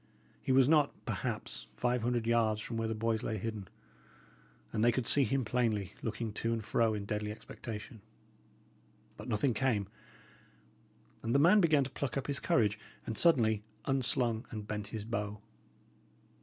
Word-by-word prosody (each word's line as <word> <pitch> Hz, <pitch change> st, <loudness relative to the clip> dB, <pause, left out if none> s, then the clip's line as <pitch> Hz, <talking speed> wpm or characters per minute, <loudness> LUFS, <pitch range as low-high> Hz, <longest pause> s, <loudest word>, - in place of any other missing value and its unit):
He -, -, -1 dB
was 130 Hz, -1 st, +6 dB
not, 150 Hz, -2 st, +4 dB
perhaps, -, -, -3 dB
five 125 Hz, -, 0 dB
hundred 120 Hz, 0 st, 0 dB
yards 115 Hz, -2 st, +2 dB
from 115 Hz, +2 st, -5 dB
where 115 Hz, 0 st, -1 dB
the 110 Hz, -, -2 dB
boys 110 Hz, 0 st, 0 dB
lay 110 Hz, -, -2 dB
hidden; 105 Hz, -1 st, -5 dB, 1.1 s
and 110 Hz, -, +1 dB
they 120 Hz, -, +6 dB
could 130 Hz, 0 st, -1 dB
see 140 Hz, -, +5 dB
him 130 Hz, +2 st, 0 dB
plainly, 110 Hz, -5 st, 0 dB
looking 110 Hz, -1 st, -3 dB
to 115 Hz, +2 st, -1 dB
and 115 Hz, -2 st, -2 dB
fro 115 Hz, -1 st, +2 dB
in 100 Hz, -1 st, -4 dB
deadly 105 Hz, 0 st, -2 dB
expectation. 110 Hz, +1 st, -8 dB, 1.1 s
But -, -, -9 dB
nothing 120 Hz, +2 st, +1 dB
came; 110 Hz, -5 st, +1 dB, 1.4 s
and 115 Hz, +3 st, -1 dB
the -, -, +7 dB
man 180 Hz, +8 st, +6 dB
began 155 Hz, -5 st, +4 dB
to 135 Hz, -, -6 dB
pluck 140 Hz, -1 st, -3 dB
up 135 Hz, -, -2 dB
his 140 Hz, -1 st, -1 dB
courage, 105 Hz, -2 st, +2 dB, 0.3 s
and 110 Hz, -, -3 dB
suddenly 110 Hz, -9 st, +4 dB, 0.2 s
unslung 125 Hz, -3 st, +1 dB
and 105 Hz, -2 st, -6 dB
bent 105 Hz, -1 st, -4 dB
his 105 Hz, -1 st, -6 dB
bow. 105 Hz, -2 st, -3 dB
115 Hz, 165 wpm, -32 LUFS, 110-130 Hz, 1.4 s, the